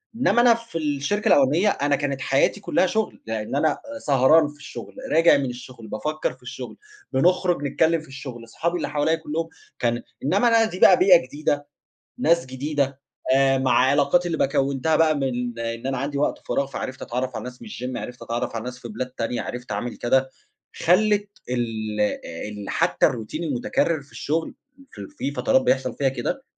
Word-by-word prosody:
إنّما 240 -1 +3
أنا 240 -1 +7
في 230 -6 -6
الشركة 150 +7 -1
الأولانية 150 +9 +4
أنا 145 -4 +1
كانت 140 -2 -2
حياتي 135 +10 +2
كلّها 190 - +1
شُغل 220 +3 -2
لأن 110 +3 -3
أنا 155 +1 +3 0.2
آآ، - - -6
سهران 145 - +4
في 145 - -11
الشغل 140 - -9 0.2
راجع 165 -2 +6
من 140 - -1
الشغل، 125 -2 -10
بافكّر 155 +9 -2
في - - -22
الشغل - - -8 0.4
بنخرج 175 +2 +2
نتكلم 160 +3 +2
في 155 - -15
الشغل 135 -3 -8
أصحابي 170 +10 -2
اللي - - -3
حواليَّ 155 +2 +1
كلّهم 160 +1 -4 0.3
كان 120 0 0 0.2
إنّما 200 - +3
أنا 230 -1 +5
دي 185 -4 -6
بقى 185 - +8
بيئة 180 -2 +7
جديدة 145 0 -2 0.5
ناس 170 - +3
جديدة 140 +1 -2 0.3
آآ، 135 0 +4
مع 130 -2 +1
علاقاتي 140 +7 +3
اللي 165 - -2
ب - - +3
كوّنتها 140 +3 +1
بقى 155 -1 +4
من 125 -3 -2
إن 115 +2 -4
أنا 135 -1 -1
عَندي 140 +1 -3
وقت 145 - 0
فراغ 140 - +1
فعرَفت 130 -1 -6
أتعرّف 125 +1 -3
على - - -5
ناس 125 0 -9
من 220 - -9
الgym 125 - -5
عرَفت 125 0 -8
أتعرَف 115 0 -3
على 110 - -4
ناس 125 0 -6
في 120 - -9
بلاد 115 +4 -4
تانية، 120 -1 -3
عرَفت 125 -3 -6
أعمل 115 +4 -3
كده 130 +2 +1 0.4
خلّت 205 +3 +3 0.2
ال 110 -3 -2
آآ، 105 -2 -2
ال 105 -1 -7
حتّى - - +2
الروتين 120 +9 -3
المتكرر 145 +2 0
في 140 - -22
الشغل 160 +3 -2 0.4
في - - -12
ال - - -8
في 295 - -4
فترات 265 - +2
بيحصل 135 - 0
فيها 135 -1 +2
كده 265 - -3
140 Hz, 190 wpm, -23 LUFS, 125-165 Hz, 0.5 s, بقى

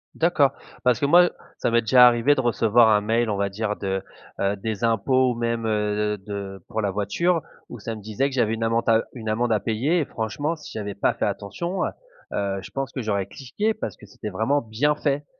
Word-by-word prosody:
D'accord 150 -5 +3 0.3
parce 125 -2 +3
que 140 - +1
moi, 175 +4 +7
heu, - - -1 0.3
ça - - 0
m'est 115 0 +3
déjà 125 +2 +7
arrivé 120 +4 +4
de 130 - +1
recevoir 115 -1 +4
un 105 -1 +4
mail 115 +2 +1
on 105 - 0
va 100 0 0
dire 105 +1 -2
de, 95 -1 -3 0.4
heu, 100 +1 +1
des 105 +1 -4
impôts 125 +3 +3
ou - - -8
même, 115 -1 -1
heu, 105 0 0
d 95 - -22
de 100 -3 -6
pour 110 -2 -2
la 100 -2 0
voiture 155 - 0 0.3
où 120 - -8
ça 115 +3 -5
me 105 - -10
disait 110 +7 -1
que 135 - -6
j'avais 115 -3 +2
une 115 0 -2
amande 115 +1 0
à, 110 - +6
heu, - - -3
une 110 -4 -6
amende 115 +2 0
à 105 - +3
payer 125 - 0
et 150 - 0
franchement 145 +9 -3
si 150 - -11
j'avais 105 -2 -5
pas - - +1
fait - - -1
attention, 170 - -3
heu, - - -1 0.4
heu, 100 -1 -1
je - - -11
pense 135 -1 -3
que 130 - -3
j'aurais 100 -3 -1
cliqué 205 - -2
parce 215 - -5
que 105 - -14
c'était 105 +2 -7
vraiment 110 +9 +1
bien 120 +7 0
fait. 145 -1 -1
115 Hz, 240 wpm, -24 LUFS, 105-135 Hz, 0.4 s, moi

